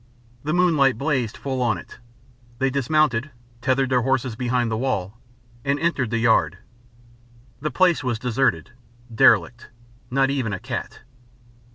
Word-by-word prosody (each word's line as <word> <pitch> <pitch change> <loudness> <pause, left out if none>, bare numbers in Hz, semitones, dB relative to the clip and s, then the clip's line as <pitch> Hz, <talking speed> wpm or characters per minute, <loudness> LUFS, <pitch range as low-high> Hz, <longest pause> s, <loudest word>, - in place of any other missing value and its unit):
The 150 - -2
moonlight 155 -8 +3
blazed 130 -5 -1
full 130 -2 -3
on 115 -6 +1
it. 85 - -12 0.6
They 135 +2 0
dismounted, 140 -1 +1 0.3
tethered 130 +1 +1
their 125 -1 +3
horses 130 -2 0
behind 120 -1 -1
the 110 - -1
wall, 110 -4 -2 0.4
and 140 +1 0
entered 145 -8 0
the 115 - -1
yard. 105 -8 +2 1.0
The 155 - -2
place 175 -2 +2
was 125 -3 -1
deserted, 115 - 0 0.4
derelict 110 +1 +3 0.4
not 135 +1 +2
even 130 -7 -2
a 95 - -4
cat. - - -6
130 Hz, 140 wpm, -23 LUFS, 115-140 Hz, 1.0 s, moonlight